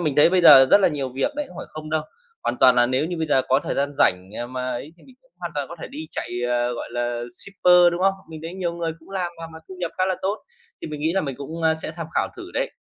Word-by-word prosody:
mình 150 -5 -1
thấy 150 - +6
bây 185 0 +3
giờ 135 -5 +10
rất - - +7
là 195 - +5
nhiều 145 -5 -3
việc 135 - 0
đấy, 295 - -1
không 180 - -14
phải - - -6
không 155 0 -8
đâu. 155 0 0 0.4
Hoàn - - -1
toàn 125 -1 +7
là 120 0 +4
nếu 130 +4 0
như 175 +1 -4
bây 160 - -1
giờ 135 -3 +3
có 135 +2 +4
thời - - -3
gian 140 +1 -1
rảnh, 90 +1 +2
à, 120 - -3
mà 130 0 -4
ấy 125 +5 -5
thì 170 - -23
mình 260 - -17 0.3
hoàn - - -5
toàn - - -3
có - - -9
thể - - -6
đi 305 +4 -7
chạy, - - -5 0.2
ờ, 120 0 +1
gọi - - -6
là 120 0 -2
shipper, 180 +2 +4
đúng 170 - -3
không? 195 0 +4
Mình 160 -1 -9
thấy 165 +2 -6
nhiều 180 -3 -2
người 170 -1 -3
cũng 160 - -19
làm 185 -3 -2
mà 165 - -6
mà 160 - -9
thu 190 - -8
nhập 175 -2 -2
khá 185 - +3
là 190 -1 0
tốt 200 +3 0 0.5
thì - - -4
mình 150 -1 -6
nghĩ 160 +3 +1
là 195 - +1
mình 140 -6 -4
cũng, 160 +4 -7
ơ, 160 0 +3
sẽ - - -4
tham 165 0 -6
khảo - - +1
thử 360 0 -9
đấy. - - -1
160 Hz, 310 wpm, -23 LUFS, 135-180 Hz, 0.5 s, giờ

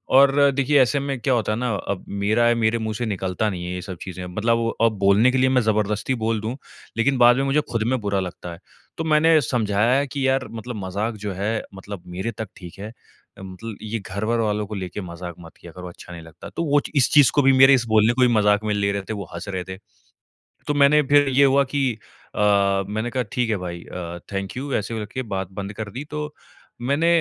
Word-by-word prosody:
और 140 +1 +6
देखिए 140 +1 +3
ऐसे 140 +3 +2
में 135 -2 -3
क्या 130 +1 +1
होता 110 -3 0
है 110 - -1
ना, 125 -2 -1
अब 100 -1 -4
मेरा 105 +4 +1
है 120 - +3
मेरे 115 0 +1
मुँह 110 -1 -3
से 120 +1 -2
निकलता 95 0 -1
नहीं 90 -2 -5
है 90 - -4
ये 90 - -4
सब 90 -1 -7
चीज़े। 90 -1 -7
मतलब 110 +6 0
वो 115 0 0
अब 115 -1 +4
बोलने 100 +6 +4
के 130 - 0
लिए 130 0 +3
मैं 130 -1 +3
ज़बरदस्ती 105 +3 0
बोल 110 -2 0
दूँ 115 +4 -3 0.4
लेकिन 135 +3 +2
बाद 120 0 +6
में 135 - +1
मुझे 140 +2 +2
खुद 115 -2 0
में 130 - 0
बुरा 100 -1 0
लगता 90 -1 -6
है। 85 - -12 0.4
तो 165 - -2
मैंने 160 +1 +4
समझाया 115 -1 +1
है 140 - -1
कि, 135 0 -2
"यार! 130 0 +1
मतलब 115 +2 -6
मज़ाक 105 +5 -2
जो 100 - -2
है 105 +4 -2
मतलब 95 -1 -9
मेरे 95 +6 -4
तक 110 -2 -7
ठीक 90 -1 -11
है। 105 +2 -7 0.5
मतलब 95 +3 -8
ये 110 +1 -4
घर-वर 110 +4 -2
वालो 105 -1 0
को 105 +1 -7
लेके 95 +1 -5
मज़ाक 85 -1 -7
मत 85 -2 -13
किया 85 - -12
करो, 90 +1 -9
अच्छा 90 0 -12
नहीं 85 - -8
लगता।" 80 +1 -12
तो 170 - -3
वो 145 -1 +3
इस 135 - +3
चीज़ 145 -4 +7
को 145 - +5
भी 135 0 +5
मेरे 135 +1 +7
बोलने 110 +1 +4
को 130 - -1
भी 125 - +6
मज़ाक 105 -1 +3
में 105 - 0
ले 100 0 +1
रहे 100 - -2
थे, - - -1
वो 100 -2 -5
हँस 85 +4 -7
रहे 95 -2 -3
थे। 95 +1 -8 0.9
तो 150 - +1
मैंने 145 +1 +5
फिर 145 -1 +5
ये 140 +2 +4
हुआ 140 +1 +4
कि, 135 -4 +1 0.4
"अ, - - -4 0.5
मैंने 110 +3 -3
कहा 125 0 -1
ठीक 120 -3 0
है 105 - +1
भाई 85 -1 -6
अ, 85 -1 -7
थैंक 95 +5 -4
यू, 140 +1 -4
ऐसे 110 +2 -2
कर 105 - -4
के 130 - -2
बात 95 -1 -4
बंद 100 +1 -6
कर 105 -1 -6
दी।" 130 +4 -6
तो 150 0 -4 0.5
मैंने 140 +7 +1
110 Hz, 245 wpm, -22 LUFS, 100-130 Hz, 0.9 s, चीज़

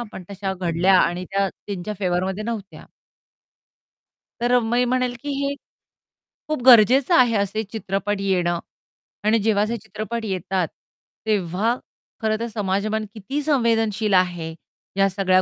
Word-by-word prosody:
आपण 210 -5 -7
तशा 195 -1 -3
घडल्या 180 +1 +2
आणि 175 +1 0
त्या 195 0 +2
त्यांच्या 200 +1 -6
फेवरमध्ये 190 +2 -1
नव्हत्या. 215 -4 -6 1.5
तर 240 +1 +1
अ, 250 - +6
मी 240 +2 +1
म्हणेल 250 0 0
की 290 - -6 0.2
हे, 280 0 -1 0.9
खूप 305 -4 -2
गरजेचं 255 - +7
आहे 245 -5 +5
असे 200 +2 0
चित्रपट 205 -1 -3
येणं 175 -3 +1 0.6
आणि 220 +2 +3
जेव्हा 210 -1 +2
असे 230 +2 -2
चित्रपट 220 +1 -5
येतात, 185 -2 -1 0.6
तेव्हा 210 +2 +1 0.5
खरं 220 -1 +1
तर 235 - -2
समाजमन 210 0 -1
किती 265 +8 -4
संवेदनशील 225 -7 +1
आहे 175 -3 +1 0.4
या 195 0 +4
सगळ्या 185 -1 +3
210 Hz, 130 wpm, -22 LUFS, 190-230 Hz, 1.5 s, गरजेचं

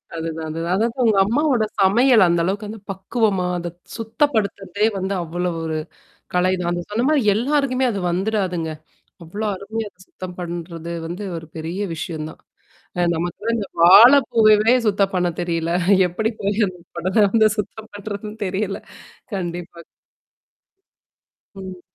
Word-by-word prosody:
அதுதான். 160 -1 -4
அதுதான். 165 +3 -1
அதாது 230 +3 +1
உங்க 220 -3 +3
அம்மாவுடைய 245 0 +1
சமையல் 225 +2 +5
அந்த 170 0 +2
அளவுக்கு 200 +3 -2
அந்தப் 210 -2 -10
பக்குவமாக 190 -2 0
அதைச் 175 0 -7 0.2
சுத்தப்படுத்துவதே 215 -5 0
வந்து 190 +1 -2
அவ்வளவு 175 +1 -3
ஒரு 160 -1 -2 0.6
கலைதான். 180 -1 +1
அந்தச் 175 +1 -4
சொன்ன 230 +4 0
மாதிரி 300 -4 +3
எல்லாருக்குமே 265 +2 +1
அது 200 - -3
வந்துடாதுங்க. 185 -3 -1 0.6
அவ்வளவு 205 +7 -4
அருமையா 220 +3 -5
அதைச் 185 0 -20
சுத்தம் 180 -1 -8
பண்றது 170 -1 -6 0.2
வந்து 175 +5 -6
ஒரு 160 -1 -8
பெரிய 165 +3 -5 0.2
விஷயம் 155 -1 -5
தான். - - -15 0.6
அ - - +2
நமக்கு 170 +1 -3
எல்லாம் 230 +2 0
இந்த 200 -3 -4
வாழைப் 235 +10 +8
பூவையே 215 +1 +5
சுத்தம் 200 -1 +1
பண்ணத் 175 -2 0
தெரியவில்ல. 170 -1 -1 0.4
எப்படிப் 215 +5 -2
போய் 205 +2 +1
அந்தக் 180 -2 -12
குடல 185 +2 -2
வந்து 220 0 +5
சுத்தம் 220 +1 -5
பண்ணுவது 205 0 -6
என்று 210 - -9
தெரியவில்ல. 195 +1 -2 0.5
கண்டிப்பா. 175 -2 -5 1.8
ம். 190 -2 -8
195 Hz, 140 wpm, -21 LUFS, 175-220 Hz, 1.8 s, வாழைப்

